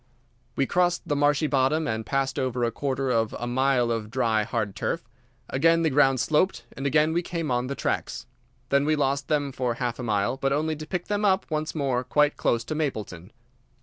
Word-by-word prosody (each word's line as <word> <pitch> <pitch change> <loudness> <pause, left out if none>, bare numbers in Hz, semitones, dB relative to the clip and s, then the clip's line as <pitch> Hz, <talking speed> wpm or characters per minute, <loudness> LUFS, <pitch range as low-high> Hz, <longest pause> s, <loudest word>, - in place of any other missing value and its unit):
We 135 - +2
crossed 175 +3 +1
the 145 - 0
marshy 145 +1 +2
bottom 150 +2 +1
and 110 -2 -2
passed 135 0 0
over 125 -2 -1
a 115 - +1
quarter 135 +1 -2
of 115 -2 0
a 120 - -4
mile 125 -1 +2
of 110 -2 -3
dry, 115 -2 +1
hard 105 -2 -2
turf. - - -3 0.4
Again 165 +5 +3
the 160 - +2
ground 135 -1 +4
sloped, 150 -1 +1
and 135 +2 -2
again 150 +2 +3
we 170 - +1
came 170 -4 -3
on 125 +1 0
the 140 - -3
tracks. - - -3 0.4
Then 140 0 +3
we 155 +1 +2
lost 140 -1 0
them 145 -2 0
for 125 -2 -2
half 120 0 -3
a - - -4
mile, 105 +2 0
but 135 0 0
only 155 +2 0
to 155 0 -8
pick 180 0 -3
them 205 0 -1
up 195 -2 +3
once 155 +1 -2
more 135 -4 0
quite 150 +3 +2
close 115 -1 0
to 125 - -4
Mapleton. 110 - -4
135 Hz, 210 wpm, -26 LUFS, 120-155 Hz, 0.4 s, ground